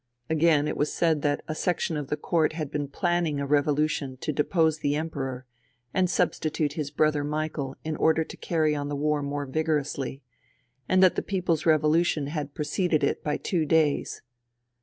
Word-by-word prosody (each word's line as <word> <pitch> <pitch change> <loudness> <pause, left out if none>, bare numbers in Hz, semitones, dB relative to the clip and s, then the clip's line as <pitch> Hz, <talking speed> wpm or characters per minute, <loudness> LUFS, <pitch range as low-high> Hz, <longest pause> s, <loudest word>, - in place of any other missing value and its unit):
Again, 155 -2 +3
it - - -2
was 150 - 0
said 160 -3 +1
that 145 0 0
a 155 - -2
section 175 0 -1
of 145 -2 -3
the 150 - -2
court 160 +1 +1
had 155 -3 -4
been 145 -1 -2
planning 170 0 0
a 140 - -1
revolution 145 -1 +1
to 155 - -2
depose 160 +1 +2
the 145 -1 0
Emperor 135 -5 -4 0.5
and 185 -1 +2
substitute 155 -4 0
his 150 -2 -3
brother 150 -1 +1
Michael 150 -2 -3
in 155 0 -3
order 160 0 +3
to - - -10
carry 155 -3 0
on 145 -1 -3
the 145 - -2
war 150 +1 0
more 145 0 -3
vigorously; 145 -2 -2 0.7
and 185 0 +5
that 185 - +6
the - - -1
people's 180 -5 -1
revolution 155 0 +3
had 145 -1 -4
preceded 155 +1 0
it 140 - 0
by 150 -1 -1
two 175 -4 -1
days. 155 -1 +1
150 Hz, 180 wpm, -26 LUFS, 145-160 Hz, 0.7 s, that